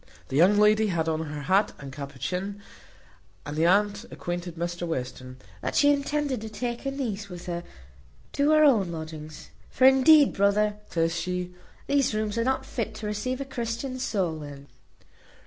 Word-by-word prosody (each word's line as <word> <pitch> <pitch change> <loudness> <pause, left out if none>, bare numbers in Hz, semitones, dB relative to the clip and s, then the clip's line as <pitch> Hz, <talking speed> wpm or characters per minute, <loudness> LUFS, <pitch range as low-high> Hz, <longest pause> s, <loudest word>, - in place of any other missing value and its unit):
The - - -3
young 185 +7 +5
lady 215 +1 +4
had 170 -4 -1
on 160 0 -1
her 150 -1 -6
hat 195 +7 +2
and 140 -2 -9
capuchin, 145 +9 -4 0.9
and 150 - -5
the 160 +2 +3
aunt 205 +2 +2
acquainted 175 -1 -5
Mr 175 +1 -3
Western, 130 -3 -5 0.2
"that - - -3
she 290 0 +5
intended 285 -3 -1
to 220 - -6
take 240 +2 -4
her - - +1
niece 220 -7 -4
with 175 -1 -9
her 175 -1 -4 0.7
to 285 +1 +2
her 310 0 +6
own 220 - +4
lodgings; 155 -1 -8 0.2
for, 260 - +2
indeed, 270 +2 +7
brother," 205 +1 +2
says 165 0 0
she, 180 +1 -3 0.3
"these 275 -5 +1
rooms 215 -1 -1
are - - +2
not 265 +2 0
fit 225 -2 -4
to 215 - -7
receive 210 +6 -2
a - - -3
Christian 255 +1 -4
soul 185 -10 -1
in." 140 -1 -9
200 Hz, 170 wpm, -26 LUFS, 165-240 Hz, 0.9 s, indeed